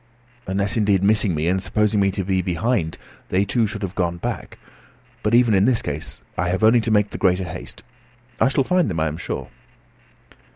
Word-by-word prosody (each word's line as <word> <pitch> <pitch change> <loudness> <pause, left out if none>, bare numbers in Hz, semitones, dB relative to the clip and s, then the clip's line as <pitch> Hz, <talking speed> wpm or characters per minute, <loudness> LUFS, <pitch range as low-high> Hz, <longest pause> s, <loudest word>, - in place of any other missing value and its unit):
Unless, 100 +3 -1
indeed, 100 -3 +2
missing 105 -3 +3
me, 75 +2 -1
and 95 +2 +1
supposing 105 +2 +1
me 100 0 +3
to 95 0 -3
be 95 0 0
behind, 90 0 -1 0.3
they 95 +2 +1
too 115 +1 +1
should 105 0 -6
have 95 -2 -4
gone 85 -3 -1
back. - - -5 0.6
But 105 +2 +2
even 120 -2 +4
in 95 0 +4
this 120 -2 +2
case 75 +1 -4
I 90 - -1
have 95 +4 -1
only 115 +2 +5
to 115 - -3
make 105 -1 +2
the - - -6
greater 95 -1 +2
haste. 85 - -8 0.6
I - - +4
shall 135 0 +1
find 180 +1 +1
them, 85 -4 -2
I 80 - +1
am 80 0 -3
sure." - - -5
100 Hz, 205 wpm, -22 LUFS, 90-110 Hz, 0.6 s, only